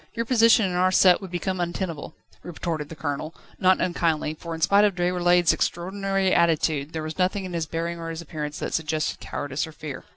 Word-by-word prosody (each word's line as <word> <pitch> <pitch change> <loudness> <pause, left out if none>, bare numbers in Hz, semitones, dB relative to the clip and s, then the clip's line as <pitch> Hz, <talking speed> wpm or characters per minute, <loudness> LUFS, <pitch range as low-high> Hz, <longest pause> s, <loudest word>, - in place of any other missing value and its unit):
Your 230 0 -1
position 230 -2 +5
in 185 - -1
our 180 +1 +2
set 185 0 +5
would 190 - -7
become 185 +1 -3
untenable," 170 -3 -4 0.3
retorted 160 -3 -4
the 160 - -8
Colonel, 145 +2 -4 0.2
not 185 -1 +4
unkindly, 165 -3 0
for 165 +1 -7
in 160 - -9
spite 200 +5 +5
of 205 -3 +2
Déroulède's 175 -1 +3
extraordinary 195 +2 -1
attitude, 160 -3 +2
there 160 -1 -3
was 155 +3 -6
nothing 190 +2 0
in 180 - -6
his 165 -2 -2
bearing 170 +1 -3
or 165 0 -5
his 165 -1 -5
appearance 150 -2 -5
that - - -4
suggested 155 -1 -1
cowardice 145 +2 -4
or - - -10
fear. 155 -3 -8
170 Hz, 200 wpm, -25 LUFS, 155-185 Hz, 0.3 s, position